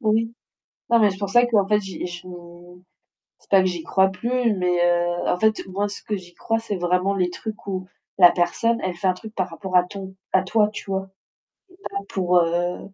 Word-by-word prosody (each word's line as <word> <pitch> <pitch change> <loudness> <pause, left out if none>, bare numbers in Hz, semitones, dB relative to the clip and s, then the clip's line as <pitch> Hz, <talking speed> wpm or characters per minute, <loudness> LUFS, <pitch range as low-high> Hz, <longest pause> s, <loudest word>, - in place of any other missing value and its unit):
Oui. 225 0 +1 0.6
Non 235 - +6
mais 210 -2 +5
c'est 190 - -7
pour 200 -1 -3
ça 240 +3 +5
qu'en 210 -5 +2
fait, 210 0 +3
j'ai 190 -4 -6
j 175 0 -8 1.2
c'est - - -29
pas 195 -1 +7
que 185 - +2
j'y 175 -3 -2
crois 190 0 +3
plus, 235 +3 0
mais, 180 -1 0
heu, 175 0 +1
en 180 - +1
fait, 220 +1 +2
moi 200 +2 -2
ce 200 - -8
que 215 - -3
j'y 175 -2 -12
crois, 225 0 -1
c'est 225 -3 -4
vraiment 180 +2 +1
les 180 -2 0
trucs 215 +4 -7
où, 185 -2 -3 0.3
la 175 -2 +9
personne, 230 +7 +1
elle 185 -1 -2
fait 175 +2 -4
un 185 - +3
truc 215 +4 -11
par 185 - -1
rapport 185 +2 -8
à 175 - +3
ton 190 0 -8 0.2
à 190 - +4
toi, 210 +2 +2
tu 205 -1 -8
vois. 190 0 -2 0.7
Pas 395 - -5
pour, 180 -2 +1
heu 175 +1 0
190 Hz, 220 wpm, -23 LUFS, 180-215 Hz, 1.2 s, la